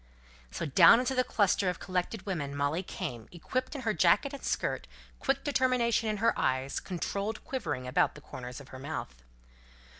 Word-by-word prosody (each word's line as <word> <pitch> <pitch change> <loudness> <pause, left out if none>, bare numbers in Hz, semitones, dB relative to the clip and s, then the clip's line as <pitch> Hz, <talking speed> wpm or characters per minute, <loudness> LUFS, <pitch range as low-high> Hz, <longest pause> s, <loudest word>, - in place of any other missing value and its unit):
So 165 - -4
down 165 - +7
into 255 +1 0
the 255 -1 +3
cluster 200 -5 +2
of 180 - -3
collected 185 +2 -3
women 145 -8 -3
Molly 145 +4 0
came, 120 - -6
equipped 255 - -3
in 275 - -4
her 225 -3 0
jacket 185 - +3
and 280 - -8
skirt; - - -1 0.3
quick 270 0 0
determination 250 -5 +2
in 210 - -1
her 225 +3 +3
eyes; 130 +1 0
controlled 200 +4 -3
quivering 150 - -3
about 125 +1 +2
the - - -11
corners 125 0 -8
of 140 - -13
her 130 - -9
mouth. 140 - -5
185 Hz, 175 wpm, -30 LUFS, 145-235 Hz, 0.3 s, down